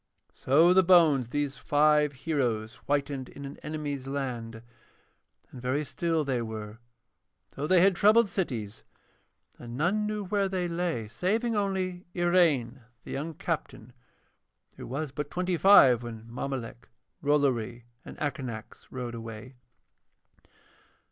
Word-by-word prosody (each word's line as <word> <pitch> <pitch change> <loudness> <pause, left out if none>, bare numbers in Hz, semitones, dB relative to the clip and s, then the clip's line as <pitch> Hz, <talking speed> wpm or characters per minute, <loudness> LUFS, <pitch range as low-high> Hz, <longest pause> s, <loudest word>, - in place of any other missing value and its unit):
So 160 +7 +4
the 190 - +6
bones 165 -8 +5
of - - -19
these 145 -1 -2
five 150 0 +3
heroes 125 -6 -2
whitened 140 -2 -1
in 140 - -9
an 140 - -8
enemy's 145 -3 -5
land, 120 -5 -4 0.9
and 125 - -10
very 130 +4 0
still 165 0 -1
they 130 -3 -1
were, 110 -1 -7 0.7
though 145 - -4
they 180 +1 +5
had 190 0 +5
troubled 215 +4 +5
cities, 115 - -4 0.8
and 120 0 -8
none 200 +8 +1
knew 210 -1 -3
where 195 +1 0
they 185 -2 -1
lay 170 -9 -2
saving 220 - -1
only 190 -3 -2
Iraine, 160 -9 +2 0.2
the - - -9
young 155 +3 -4
captain, 145 -8 -5 0.8
who - - -9
was 140 +3 -4
but 145 +1 -5
twenty 180 +2 -1
five 145 - +7
when 115 -2 -8
Mommolek, 120 -1 -6 0.3
Rollory, 130 -5 +1 0.2
and - - -11
Akanax 130 -7 -5
rode 125 -2 -5
away. 115 +2 -8
145 Hz, 130 wpm, -28 LUFS, 120-175 Hz, 0.9 s, five